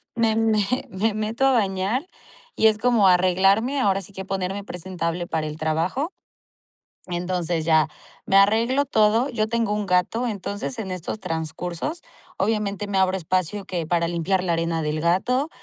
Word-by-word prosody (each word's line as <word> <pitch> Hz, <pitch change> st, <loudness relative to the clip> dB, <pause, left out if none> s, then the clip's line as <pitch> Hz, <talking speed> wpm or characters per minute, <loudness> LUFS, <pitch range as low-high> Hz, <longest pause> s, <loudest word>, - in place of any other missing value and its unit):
Me 225 Hz, -1 st, +2 dB
me 220 Hz, -2 st, +2 dB, 0.3 s
me 205 Hz, +4 st, 0 dB
meto 220 Hz, +5 st, 0 dB
a -, -, +4 dB
bañar 205 Hz, -, 0 dB, 0.5 s
y 220 Hz, -, +5 dB
es 215 Hz, -1 st, +3 dB
como 230 Hz, -4 st, +3 dB
arreglarme. 195 Hz, +8 st, +3 dB
Ahora 195 Hz, -5 st, +2 dB
sí 200 Hz, +2 st, -11 dB
que 190 Hz, 0 st, -6 dB
ponerme 195 Hz, +1 st, -3 dB
presentable 175 Hz, -2 st, -4 dB
para 155 Hz, -1 st, -2 dB
el 150 Hz, 0 st, -6 dB
trabajo. 165 Hz, -, -1 dB, 1.0 s
Entonces 175 Hz, -2 st, -2 dB
ya 160 Hz, -1 st, +4 dB, 0.4 s
me 195 Hz, -, +3 dB
arreglo 230 Hz, +8 st, +4 dB
todo. 225 Hz, +1 st, +3 dB
Yo 215 Hz, -3 st, 0 dB
tengo 230 Hz, -2 st, 0 dB
un 210 Hz, -1 st, -1 dB
gato. 180 Hz, +7 st, +1 dB
Entonces, 205 Hz, +3 st, -4 dB
en 195 Hz, -4 st, -4 dB
estos 185 Hz, +4 st, -4 dB
transcursos, 170 Hz, -, -4 dB, 0.4 s
obviamente 205 Hz, -1 st, -1 dB
me 200 Hz, -1 st, -1 dB
abro 190 Hz, 0 st, +2 dB
espacio 185 Hz, +3 st, -1 dB
que 175 Hz, -4 st, -3 dB
para 170 Hz, -1 st, +1 dB
limpiar 175 Hz, +2 st, 0 dB
la 175 Hz, -, 0 dB
arena 165 Hz, 0 st, -1 dB
del 155 Hz, 0 st, -2 dB
gato, 220 Hz, -, +1 dB
195 Hz, 160 wpm, -23 LUFS, 175-220 Hz, 1.0 s, y